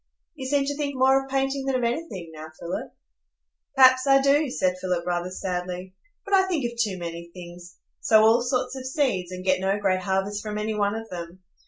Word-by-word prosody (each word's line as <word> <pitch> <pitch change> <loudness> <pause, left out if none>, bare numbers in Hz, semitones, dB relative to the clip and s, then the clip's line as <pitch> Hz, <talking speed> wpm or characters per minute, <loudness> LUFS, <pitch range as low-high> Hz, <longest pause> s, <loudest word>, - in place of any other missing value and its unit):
"You 265 -5 -6
seem 280 0 +1
to 285 +1 -2
think 285 -1 -3
more 265 +1 +4
of 270 - -13
painting 270 0 -1
than 270 - +1
of 250 - 0
anything 235 - -3
now, 155 0 -8
Philip?" 170 - -5 0.8
"Perhaps 260 0 +6
I 275 0 +6
do," 280 +2 +3
said 185 -6 0
Philip, 180 -2 -1
rather 175 0 -1
sadly; 180 0 -4 0.3
"but 400 - -5
I 380 -1 +5
think 325 -9 -1
of 235 0 -3
too 210 -5 0
many 170 -1 -7
things,—sow 175 +5 -1
all 225 +2 +5
sorts 250 +1 -1
of 260 -1 -6
seeds, 250 - -1
and 185 0 -7
get 185 -1 +3
no 195 +1 +1
great 190 -2 +1
harvest 195 +2 -1
from 210 -1 -5
any 215 +1 -2
one 205 0 0
of 225 0 -6
them. 175 +1 -8
210 Hz, 205 wpm, -25 LUFS, 185-270 Hz, 0.8 s, Perhaps